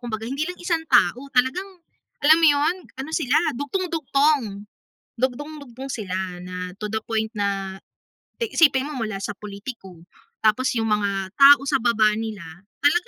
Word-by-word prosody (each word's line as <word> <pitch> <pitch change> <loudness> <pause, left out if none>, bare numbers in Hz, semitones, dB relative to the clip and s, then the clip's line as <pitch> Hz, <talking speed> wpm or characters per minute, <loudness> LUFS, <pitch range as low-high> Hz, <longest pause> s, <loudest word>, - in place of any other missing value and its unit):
kumbaga 225 -3 -5
hindi 280 +4 -2
lang 360 - -7
isang 335 -2 -1
tao 245 -2 +4
talagang, 260 +10 +1 0.6
alam 315 +2 +7
mo 330 - +6
'yun, 290 +3 +3 0.2
ano 270 +4 -5
sila, 285 -4 +1 0.2
dugtung-dugtong, 285 - 0 0.5
dugtung-dugtong 270 0 -4
sila 185 -4 -4
na 180 0 -6
to 210 - -3
the 220 - 0
point 220 -1 -1
na 195 -2 -2 0.6
eh, 455 -2 -1
isipin 280 -5 +4
mo 275 - -5
mula 215 -2 -4
sa 210 - -3
politiko, 200 -4 -9 0.4
tapos 220 +5 +2
'yung 225 0 0
mga 200 -2 -1
tao 280 0 +8
sa - - +1
baba 225 -3 +3
nila, 220 -4 -5 0.4
talaga 345 +5 +3
245 Hz, 150 wpm, -23 LUFS, 205-285 Hz, 0.6 s, tao